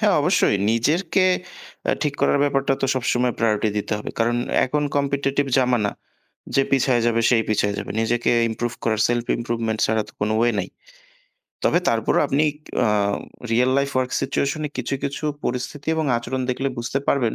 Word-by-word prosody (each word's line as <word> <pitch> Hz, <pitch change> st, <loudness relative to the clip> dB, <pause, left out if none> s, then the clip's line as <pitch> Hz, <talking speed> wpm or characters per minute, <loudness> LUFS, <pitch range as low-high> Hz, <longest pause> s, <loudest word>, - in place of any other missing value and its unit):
হ্যাঁ 210 Hz, -3 st, +3 dB
অবশ্যই। 155 Hz, -, +3 dB
নিজেরকে 160 Hz, +11 st, +2 dB, 0.7 s
আ -, -, +2 dB
ঠিক 145 Hz, -2 st, -1 dB
করার -, -, +3 dB
ব্যাপারটা 135 Hz, -1 st, +1 dB
তো -, -, +1 dB
সবসময় 125 Hz, -1 st, 0 dB
প্রায়োরিটি 110 Hz, -1 st, +1 dB
দিতে 105 Hz, -, -3 dB
হবে। -, -, -6 dB
কারণ 120 Hz, +1 st, +2 dB, 0.3 s
এখন 150 Hz, +3 st, -1 dB
কম্পিটিটিভ 140 Hz, 0 st, 0 dB
জামানা। 125 Hz, -5 st, +2 dB, 0.6 s
যে 135 Hz, -, +4 dB
পিছায়ে 130 Hz, -3 st, +2 dB
যাবে, 115 Hz, 0 st, +2 dB
সেই 115 Hz, -2 st, +4 dB
পিছিয়ে 105 Hz, -1 st, +1 dB
যাবে। -, -, -6 dB
নিজেকে 120 Hz, +1 st, +1 dB, 0.2 s
ইমপ্রুভ 120 Hz, +1 st, -3 dB
করার 110 Hz, -2 st, +1 dB
সেলফ 120 Hz, 0 st, 0 dB
ইমপ্রুভমেন্ট 115 Hz, -2 st, -2 dB
ছাড়া 110 Hz, -1 st, +1 dB
তো -, -, -14 dB
কোনো 105 Hz, +1 st, 0 dB
ওয়ে 120 Hz, +1 st, +4 dB
নাই। 95 Hz, -, -2 dB, 1.0 s
তবে -, -, +4 dB
তারপরও -, -, +2 dB
আপনি 145 Hz, +3 st, +1 dB, 0.4 s
অ্যা 120 Hz, -4 st, +3 dB, 0.6 s
রিয়াল 125 Hz, +3 st, +3 dB
লাইফ 140 Hz, 0 st, 0 dB
ওয়ার্ক 130 Hz, 0 st, 0 dB
সিচুয়েশন 140 Hz, +3 st, -1 dB
এ -, -, -23 dB
কিছু, 125 Hz, +2 st, -2 dB
কিছু 140 Hz, +2 st, -4 dB, 0.2 s
পরিস্থিতি 125 Hz, +4 st, -4 dB
এবং 160 Hz, 0 st, 0 dB
আচরণ 120 Hz, +3 st, -3 dB
দেখলে 135 Hz, +2 st, -1 dB
বুঝতে 120 Hz, +3 st, -1 dB
পারবেন 120 Hz, -5 st, +2 dB
125 Hz, 170 wpm, -22 LUFS, 115-140 Hz, 1.0 s, যে